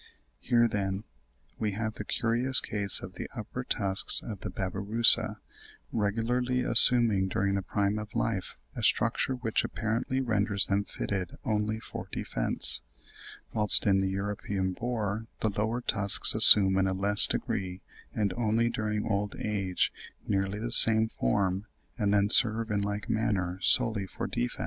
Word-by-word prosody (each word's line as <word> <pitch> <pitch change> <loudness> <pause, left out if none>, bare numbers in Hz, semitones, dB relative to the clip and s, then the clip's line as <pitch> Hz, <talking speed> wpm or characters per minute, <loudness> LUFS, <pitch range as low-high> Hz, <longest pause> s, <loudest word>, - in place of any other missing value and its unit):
Here, 120 -1 +1
then, 100 -2 -4 0.6
we 105 -2 -2
have 110 +1 -4
the 105 - -8
curious 120 +5 +1
case 100 -2 -1
of - - -10
the - - -8
upper - - -7
tusks 95 -1 0
of 105 -4 -8
the - - -7
Babirusa 100 +5 +4 0.5
regularly 120 +4 -2
assuming 115 -8 +5
during 100 +1 -2
the 100 - -1
prime 100 +3 -2
of 105 -1 -10
life 100 -5 -3 0.2
a - - -6
structure 130 - 0
which 120 -3 -2
apparently 115 +4 -3
renders 105 -5 0
them 100 0 -1
fitted 95 -4 -5
only 110 -1 -2
for - - -9
defence; - - 0 0.7
whilst 105 0 +3
in 95 -2 +2
the 95 0 -1
European 100 -1 -4
boar 110 -1 -4
the 110 - 0
lower 110 +4 -3
tusks 105 -4 +2
assume 95 -2 +6
in 95 - +1
a 95 - -2
less 100 +2 +4
degree 95 -1 -4 0.3
and 100 -3 -2
only 115 0 0
during 105 -2 -3
old 100 -1 -3
age 100 -4 -2 0.3
nearly 95 0 -2
the 115 +3 -5
same 110 -1 +7
form, 95 - -2 0.3
and 100 -2 0
then 100 0 +2
serve 110 0 +3
in 100 -1 -1
like 105 0 -5
manner 100 -5 -2
solely 105 0 +3
for - - -7
defence. - - -4
105 Hz, 150 wpm, -27 LUFS, 100-115 Hz, 0.7 s, same